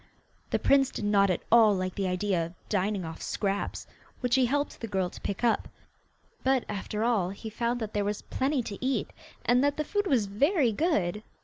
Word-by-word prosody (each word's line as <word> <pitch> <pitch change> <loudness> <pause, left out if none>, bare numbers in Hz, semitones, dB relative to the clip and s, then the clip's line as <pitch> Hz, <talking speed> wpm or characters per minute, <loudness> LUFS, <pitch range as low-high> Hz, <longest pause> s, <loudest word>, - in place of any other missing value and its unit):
The - - +1
prince 275 -1 +4
did 210 - -5
not 200 -1 +4
at 180 - -1
all 220 -3 +7
like 185 -1 -2
the 195 -1 -1
idea 185 -1 0
of 170 +2 -11
dining 200 -2 0
off 160 0 -7
scraps, 200 -1 -2 0.4
which 250 -2 0
he 260 -2 +4
helped 285 +3 -1
the 230 - -3
girl 190 -3 -1
to - - -11
pick 200 +3 -4
up, 235 - +2 0.8
but, 265 -1 +2
after 210 +1 -3
all, 220 -7 +2
he 215 +3 -7
found 235 +2 -1
that 220 -2 -5
there 205 - +1
was 205 +1 -3
plenty 265 -1 0
to 205 +1 -7
eat, 265 0 0 0.3
and 245 +2 +4
that 285 0 +1
the 305 - 0
food 410 +3 -1
was 245 - +3
very 270 - +2
good. 210 - 0
215 Hz, 205 wpm, -28 LUFS, 195-260 Hz, 0.8 s, all